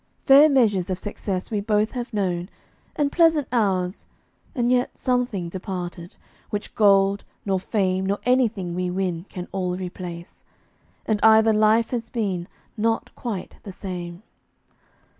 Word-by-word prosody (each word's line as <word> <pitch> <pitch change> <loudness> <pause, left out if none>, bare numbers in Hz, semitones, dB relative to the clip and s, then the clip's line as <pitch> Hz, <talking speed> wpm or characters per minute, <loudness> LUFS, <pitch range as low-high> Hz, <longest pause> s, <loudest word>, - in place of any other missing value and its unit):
Fair 285 +2 +8
measures 215 -10 +2
of 185 - -1
success 195 -1 -4
we 210 -2 0
both 210 +1 +1
have 245 -2 -5
known, 185 -4 -1 0.5
And 290 -2 +1
pleasant 325 -5 +3
hours, 195 -5 0 0.5
and 240 -1 +1
yet 250 0 +1
something 245 -8 -1
departed 175 -1 -6 0.3
Which 205 0 -5
gold, 200 -1 +4 0.2
nor 190 -2 +1
fame, 190 -1 0
nor 200 +1 0
anything 230 -8 +1
we 180 0 -2
win 180 -2 -2
Can 180 -1 -7
all 180 -2 -2
replace. 180 -1 -8 0.6
And 215 -2 0
either 220 0 +6
life 215 +2 +3
has 230 -2 -3
been 190 -7 -2 0.3
Not 225 +1 -1
quite 220 -7 -6
the 200 - -8
same. 180 -1 -7
200 Hz, 140 wpm, -23 LUFS, 185-230 Hz, 0.6 s, Fair